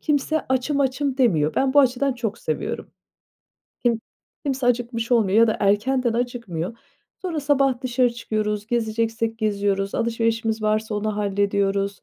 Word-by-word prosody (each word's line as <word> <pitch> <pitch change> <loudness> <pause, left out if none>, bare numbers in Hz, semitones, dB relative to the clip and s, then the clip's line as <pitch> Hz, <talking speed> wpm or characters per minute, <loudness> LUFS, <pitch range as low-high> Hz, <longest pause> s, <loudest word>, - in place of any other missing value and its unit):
kimse, 305 +1 +1
"Açım, 260 +3 +1
açım." 270 0 0
demiyor. 165 - +2
Ben 265 0 +1
bu 290 - +8
açıdan 265 +1 +2
çok 230 -3 -4
seviyorum. - - -4 0.9
Kim 235 -2 +2 0.4
kimse 270 -3 -1
acıkmış 240 -1 0
olmuyor 215 -3 +3
ya 230 - +7
da 220 - 0
erkenden 235 +5 +2
acıkmıyor. 230 -5 -3 0.5
Sonra 340 -5 -2
sabah 275 -3 +2
dışarı 250 -1 +2
çıkıyoruz, 210 -2 -2
gezeceksek 225 0 -1
geziyoruz, 200 -2 0
alışverişimiz 225 -1 0
varsa 215 0 0
onu 210 0 -2
hallediyoruz. 200 -1 0
230 Hz, 135 wpm, -23 LUFS, 210-255 Hz, 0.9 s, bu